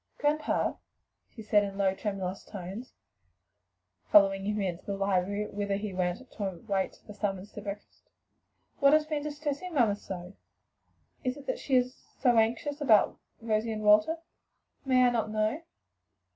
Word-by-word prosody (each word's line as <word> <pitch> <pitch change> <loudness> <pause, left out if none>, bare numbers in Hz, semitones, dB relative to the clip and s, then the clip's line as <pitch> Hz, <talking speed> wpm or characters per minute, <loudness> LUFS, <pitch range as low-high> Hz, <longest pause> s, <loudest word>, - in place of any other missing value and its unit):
"Grandpa," 300 +1 +1 0.6
she 225 - -8
said 210 -1 +4
in 195 -1 -5
low, 195 -1 +2
tremulous 195 -2 -4
tones, 200 +6 -8 1.2
following 195 -1 +6
him 210 +1 -1
into 185 -3 -2
the 200 -1 -4
library, 195 +1 0
whither 200 -1 -2
he 205 0 -4
went 180 -1 0
to 210 - -6
await 195 +1 -2
the 210 - -9
summons 200 -1 -3
to 210 - -8
breakfast, 200 0 -9 0.7
"what 280 0 +6
has 310 0 +5
been 305 -1 -2
distressing 300 +3 -4
mamma 225 -7 +4
so? 185 -2 -8 0.9
is 255 0 -1
it 285 - -11
that - - -2
she 270 - 0
is 250 0 +1 0.2
so 245 -3 +4
anxious 285 +7 +1
about 220 -8 +4 0.3
Elsie 220 +1 +1
and 215 -1 -4
Walter? 210 +10 +5 0.7
May 255 -1 +4
I 245 - +4
not 225 -2 0
know?" 215 +7 0
210 Hz, 155 wpm, -29 LUFS, 195-255 Hz, 1.2 s, following